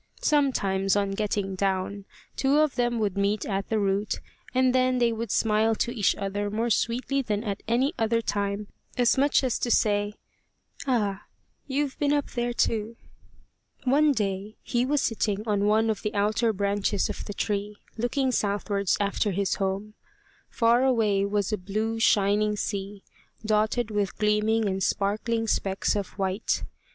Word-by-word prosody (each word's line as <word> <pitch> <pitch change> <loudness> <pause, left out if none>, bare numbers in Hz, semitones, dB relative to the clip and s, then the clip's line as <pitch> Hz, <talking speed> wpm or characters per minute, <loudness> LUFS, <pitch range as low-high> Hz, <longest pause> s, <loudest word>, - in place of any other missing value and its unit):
Sometimes, 200 -10 +2
on 200 -1 +1
getting 200 -1 -1
down, 195 +1 -1 0.3
two 275 +2 +2
of 305 -2 +3
them 240 -1 0
would 200 -3 -1
meet 200 +2 0
at 195 -1 -2
the 220 - +1
root, 200 0 0 0.3
and 255 0 +3
then 255 0 +2
they 240 -1 +3
would 225 0 -4
smile 220 +2 +2
to 235 - -1
each 215 -6 +2
other 205 0 -3
more 225 +3 -1
sweetly 250 +5 0
than 210 -4 -2
at 200 -3 -3
any 255 +7 +2
other 230 +1 +2
time, 205 -1 -2 0.3
as 245 -2 +4
much 280 +1 +3
as 255 -3 0
to 245 - -1
say, 205 -2 +2 0.7
"Ah, 210 -6 0 0.4
you've 280 0 -2
been 290 -1 +2
up 290 -1 -1
there 240 -1 -1
too!" 230 -1 -1 0.9
One 290 +3 +4
day 205 -3 -2
he 245 +1 0
was 290 0 +1
sitting 215 -2 -1
on 205 -1 +1
one 220 +2 +3
of 220 -2 -1
the 210 +1 -3
outer 215 +3 +2
branches 200 0 0
of - - -5
the 205 - -5
tree, 205 0 -2 0.2
looking 255 +3 0
southwards 200 -3 0
after 205 +1 0
his 195 0 0
home. 195 +2 -2 0.6
Far 235 +1 +3
away 215 -6 +2
was 205 0 -1
a 215 - -1
blue 215 +4 -2
shining 210 -1 +3
sea, 200 -1 -4 0.4
dotted 215 +2 +1
with 205 -3 -1
gleaming 210 +1 +2
and 190 0 -2
sparkling 215 +4 0
specks 195 -1 0
of 200 -2 -1
white. 190 +1 -1
210 Hz, 160 wpm, -26 LUFS, 200-235 Hz, 0.9 s, as